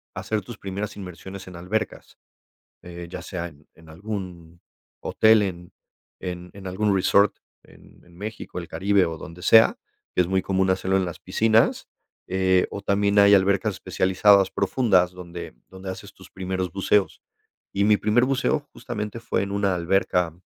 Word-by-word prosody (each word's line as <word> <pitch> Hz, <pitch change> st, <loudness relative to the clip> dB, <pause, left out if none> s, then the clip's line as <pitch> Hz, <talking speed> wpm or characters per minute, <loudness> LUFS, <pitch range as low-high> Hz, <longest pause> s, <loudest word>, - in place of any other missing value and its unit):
hacer 110 Hz, -, -2 dB
tus 110 Hz, +4 st, -10 dB
primeras 100 Hz, +2 st, -5 dB
inmersiones 95 Hz, 0 st, -9 dB
en 90 Hz, -, -11 dB
albercas, 105 Hz, +6 st, -4 dB, 0.7 s
eh, 85 Hz, 0 st, -8 dB
ya -, -, -7 dB
sea 85 Hz, -3 st, -5 dB
en 75 Hz, -3 st, -15 dB
en 80 Hz, -1 st, -18 dB
algún 90 Hz, -2 st, -7 dB, 0.4 s
hotel, 110 Hz, -1 st, +4 dB
en 90 Hz, -3 st, -5 dB, 0.5 s
en 90 Hz, -1 st, -6 dB
en 100 Hz, -1 st, -10 dB
algún 100 Hz, +3 st, 0 dB
resort, 100 Hz, +2 st, +3 dB, 0.3 s
en -, -, -20 dB
en 85 Hz, -1 st, -20 dB
México, 105 Hz, 0 st, -7 dB
el 85 Hz, -, -6 dB
Caribe 100 Hz, +1 st, +2 dB
o 80 Hz, -1 st, -5 dB
donde 85 Hz, +3 st, -10 dB
sea, 110 Hz, +4 st, +6 dB, 0.4 s
que -, -, +4 dB
es -, -, -3 dB
muy 95 Hz, +1 st, +1 dB
común 95 Hz, 0 st, +1 dB
hacerlo 95 Hz, +1 st, +1 dB
en 95 Hz, -, +2 dB
las 85 Hz, -2 st, -6 dB
piscinas, 110 Hz, +1 st, +2 dB, 0.4 s
eh, 95 Hz, -1 st, +2 dB
o 100 Hz, -, -5 dB
también 100 Hz, +1 st, +2 dB
hay 100 Hz, 0 st, +7 dB
albercas 100 Hz, +2 st, +2 dB
especializadas 95 Hz, +2 st, +3 dB
profundas 95 Hz, -8 st, +2 dB
donde 90 Hz, -5 st, -9 dB
donde 95 Hz, 0 st, -8 dB
haces 95 Hz, -, -9 dB
tus -, -, -16 dB
primeros 95 Hz, -1 st, -3 dB
buceos. 100 Hz, +1 st, +1 dB, 0.5 s
Y 100 Hz, -, +2 dB
mi 105 Hz, 0 st, +5 dB
primer 110 Hz, +4 st, +2 dB
buceo 135 Hz, +3 st, +1 dB
justamente 105 Hz, +1 st, -5 dB
fue 115 Hz, -, -1 dB
en 100 Hz, -, -4 dB
una 100 Hz, -1 st, +1 dB
alberca 90 Hz, -1 st, 0 dB
95 Hz, 165 wpm, -24 LUFS, 90-100 Hz, 0.7 s, hay